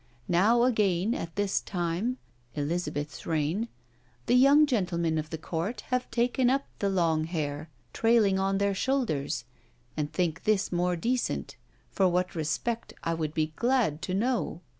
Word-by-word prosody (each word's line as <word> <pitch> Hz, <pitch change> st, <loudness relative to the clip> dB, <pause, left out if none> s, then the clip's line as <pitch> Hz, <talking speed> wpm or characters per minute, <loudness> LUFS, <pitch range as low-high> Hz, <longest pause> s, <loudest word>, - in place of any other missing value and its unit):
Now 215 Hz, +7 st, +4 dB
again 210 Hz, -4 st, +2 dB
at 165 Hz, -7 st, -5 dB
this 205 Hz, -1 st, 0 dB
time 180 Hz, +7 st, -2 dB, 0.4 s
(Elizabeth's 150 Hz, -1 st, -3 dB
reign), 165 Hz, +7 st, 0 dB, 0.6 s
the -, -, +2 dB
young 275 Hz, +4 st, +7 dB
gentlemen 170 Hz, -, 0 dB
of 155 Hz, 0 st, -5 dB
the 160 Hz, -, -4 dB
court 165 Hz, +8 st, -3 dB
have 250 Hz, 0 st, 0 dB
taken 245 Hz, +1 st, +2 dB
up 275 Hz, +2 st, +1 dB
the 200 Hz, -, +1 dB
long 165 Hz, -4 st, +1 dB
haire 155 Hz, -2 st, -3 dB, 0.2 s
trayling 225 Hz, -4 st, +3 dB
on 195 Hz, 0 st, +1 dB
their 200 Hz, 0 st, +1 dB
shoulders, 190 Hz, -, -1 dB, 0.5 s
and 150 Hz, -1 st, -2 dB
think 170 Hz, -3 st, -1 dB
this 210 Hz, -2 st, +1 dB
more 180 Hz, 0 st, +1 dB
decent; 240 Hz, +9 st, -1 dB, 0.4 s
for 190 Hz, -, +3 dB
what 180 Hz, +1 st, 0 dB
respect 165 Hz, +9 st, -2 dB
I 165 Hz, -, 0 dB
would 155 Hz, -2 st, -3 dB
be 155 Hz, -1 st, 0 dB
glad 235 Hz, -, +1 dB
to 185 Hz, -, -2 dB
know." 210 Hz, -6 st, -1 dB
185 Hz, 150 wpm, -28 LUFS, 160-235 Hz, 0.6 s, young